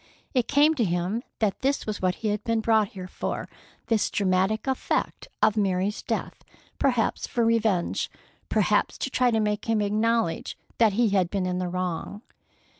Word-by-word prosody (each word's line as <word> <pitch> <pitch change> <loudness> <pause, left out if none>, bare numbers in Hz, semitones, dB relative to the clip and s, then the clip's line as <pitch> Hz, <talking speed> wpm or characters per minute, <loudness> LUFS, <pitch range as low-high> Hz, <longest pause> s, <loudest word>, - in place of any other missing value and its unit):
It 250 -4 +1
came 295 +2 +4
to 265 -7 0
him 180 +4 -1 0.2
that 210 -3 0
this 275 +2 0
was 215 -1 -4
what 185 -1 +1
he - - +2
had 210 0 -2
been 230 -1 +1
brought 220 -1 +3
here 185 -2 -8
for, - - -4 0.4
this 225 -3 +1
dramatic 190 +2 +1
effect 265 -1 -1 0.2
of 215 - +4
Mary's 195 0 0
death, - - -4 0.4
perhaps 245 -5 +1
for 235 -1 0
revenge, 220 -6 +1 0.4
perhaps - - +2
to 270 - -3
try 250 -1 +3
to 225 -2 +1
make 210 -1 -1
him 225 -1 +1
acknowledge 215 -2 0 0.2
that 225 -3 +5
he 230 +2 +3
had 190 -3 +2
been 195 -1 -1
in 180 0 -1
the 180 -1 -2
wrong. 185 +4 -4
210 Hz, 175 wpm, -26 LUFS, 185-230 Hz, 0.4 s, that